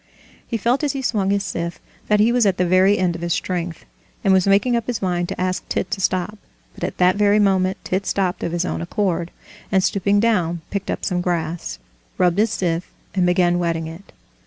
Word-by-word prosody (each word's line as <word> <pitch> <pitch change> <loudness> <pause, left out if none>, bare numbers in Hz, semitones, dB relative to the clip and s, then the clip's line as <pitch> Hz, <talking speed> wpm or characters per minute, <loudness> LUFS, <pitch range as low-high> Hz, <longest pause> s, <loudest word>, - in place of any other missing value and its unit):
He 230 - -1
felt 240 +7 +1
as 290 -2 +1
he 270 -1 -4
swung 205 -6 0
his 200 0 +1
scythe 170 -2 -4 0.3
that 210 0 +3
he 220 +3 +4
was 240 -3 +3
at 190 - +1
the 180 - +2
very 185 +3 +4
end 180 -2 +1
of 170 - -7
his 170 -1 0
strength, 175 -2 -3 0.4
and 195 - +4
was 190 0 +3
making 205 +5 +3
up 235 -1 -2
his 245 -3 -1
mind 175 -2 -1
to - - -5
ask 185 0 -2
Tit 190 - -2
to 200 - -2
stop. 185 +3 -1 0.3
But - - -10
at - - -3
that 180 +1 +3
very 205 0 +4
moment 190 -2 +2
Tit 190 +1 -2
stopped 185 -3 0
of 170 - -2
his 175 +1 -1
own - - -3
accord, 175 -2 -1 0.4
and 190 -2 +3
stooping 200 +1 +2
down 180 -7 +1
picked 200 0 -3
up - - -2
some 180 -3 0
grass, 165 - -2 0.4
rubbed 180 +1 +2
his 220 +2 +3
scythe, 175 -4 -2 0.2
and 185 -2 +2
began 175 -1 +3
whetting 165 -2 -1
it. 165 +5 -10
185 Hz, 220 wpm, -21 LUFS, 175-205 Hz, 0.4 s, he